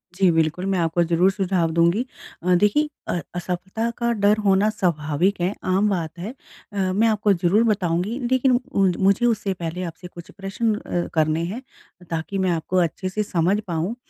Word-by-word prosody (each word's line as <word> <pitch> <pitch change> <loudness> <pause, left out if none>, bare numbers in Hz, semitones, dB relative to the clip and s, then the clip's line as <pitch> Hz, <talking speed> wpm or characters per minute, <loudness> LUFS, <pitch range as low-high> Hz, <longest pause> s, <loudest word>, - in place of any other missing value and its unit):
जी, 190 -1 +4
बिल्कुल 165 +3 0
मैं 195 -2 0
आपको 170 +1 +1
ज़रूर 175 +3 +3
सुझाव 185 -4 0
दूँगी। 170 +8 +2 0.4
अ, 180 0 +3
देखिए 295 +9 +2 0.2
अ, - - -1 0.2
असफलता 190 +6 -3
का 235 0 0
डर 210 +1 +5
होना 195 +2 +4
स्वाभाविक 175 -2 0
है, 180 +4 +1
आम 195 +3 +2
बात 170 -3 -3
है। 190 +6 -4 0.4
अ, - - -6 0.2
मैं 220 +4 +3
आपको 210 -2 +2
ज़रूर 185 +4 +2
बताऊँगी 195 0 0
लेकिन 260 0 +3 0.2
मु 195 - +4 0.3
मुझे 220 +5 0
उससे 215 -4 +1
पहले 175 +1 -5
आपसे 170 +1 -7
कुछ 170 -1 -12
प्रश्न 200 +3 -2
अ, 175 -4 -3
करने 155 +1 +1
हैं 215 +8 -5 0.5
ताकि 165 +4 -3
मैं 190 -1 +1
आपको 170 +2 -1
अच्छे 185 +4 -6
से 210 +3 -1
समझ 185 +2 +1
पाऊँ। 170 +7 -2
185 Hz, 180 wpm, -23 LUFS, 170-210 Hz, 0.5 s, डर